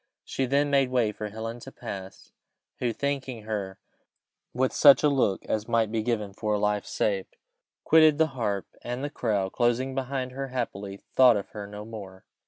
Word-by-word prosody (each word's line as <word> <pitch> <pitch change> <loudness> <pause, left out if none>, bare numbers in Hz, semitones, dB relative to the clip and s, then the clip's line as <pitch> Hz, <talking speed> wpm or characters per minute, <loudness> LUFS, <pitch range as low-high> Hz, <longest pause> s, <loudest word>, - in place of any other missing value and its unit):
She 130 - -2
then 145 +2 +2
made 135 -2 +3
way 120 -4 +2
for 105 0 -6
Helen 115 +3 -6
to 135 - -10
pass, 95 -7 -8 0.5
who, 120 -2 0
thanking 130 -2 -3
her 100 -3 -4 0.7
with 130 +1 0
such 140 -1 +7
a 150 - +5
look 125 -9 +1
as 110 0 -2
might 115 -2 +1
be 110 -1 0
given 105 -3 -2
for 105 +1 -1
a - - -1
life 105 0 0
saved, 100 -3 -1 0.5
quitted 155 -2 +6
the 160 0 +3
harp, 105 -6 -1 0.2
and 125 +2 -4
the 145 - -3
crowd, 100 -8 -1
closing 125 +2 +1
behind 130 -1 -3
her, 135 +1 -4
happily 100 -6 -4 0.2
thought 125 -4 +7
of 100 - -5
her 105 -1 -7
no 105 +1 -8
more. 100 -4 -10
115 Hz, 185 wpm, -27 LUFS, 105-130 Hz, 0.7 s, such